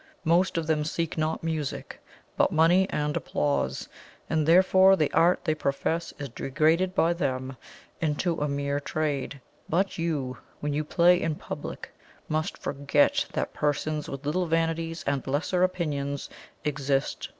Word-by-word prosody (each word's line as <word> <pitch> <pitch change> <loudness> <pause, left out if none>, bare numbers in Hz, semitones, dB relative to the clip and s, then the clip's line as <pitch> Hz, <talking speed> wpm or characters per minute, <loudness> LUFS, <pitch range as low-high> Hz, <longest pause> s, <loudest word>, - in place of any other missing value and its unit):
Most 170 +3 +3
of 165 - 0
them 155 -1 +1
seek 165 +1 -2
not 155 0 -1
music, 160 -3 -4 0.3
but - - +3
money 175 +4 +4
and 150 0 -1
applause; 145 -1 -1 0.4
and 155 -1 +1
therefore 190 +2 +6
the 155 -5 0
art 175 +2 +4
they 155 - +2
profess 155 +3 -1
is 145 - -5
degraded 160 +9 +1
by 165 +1 +3
them 130 -5 -2 0.5
into 165 +1 0
a 150 - +1
mere 140 0 -1
trade. 145 -2 -2 0.3
But 185 +2 0
you, 145 -7 -2 0.2
when 145 0 -2
you 150 +2 0
play 175 +3 +4
in 160 -2 -1
public, - - -7 0.4
must 155 +1 -2
forget 145 +1 +1
that - - -2
PERSONS 150 +1 -1
with 140 0 -7
little 175 +4 0
vanities 165 0 -1
and 140 -2 -1
lesser 155 +6 0
opinions 145 -6 -1 0.3
exist. 140 -2 -1
155 Hz, 145 wpm, -27 LUFS, 145-165 Hz, 0.5 s, therefore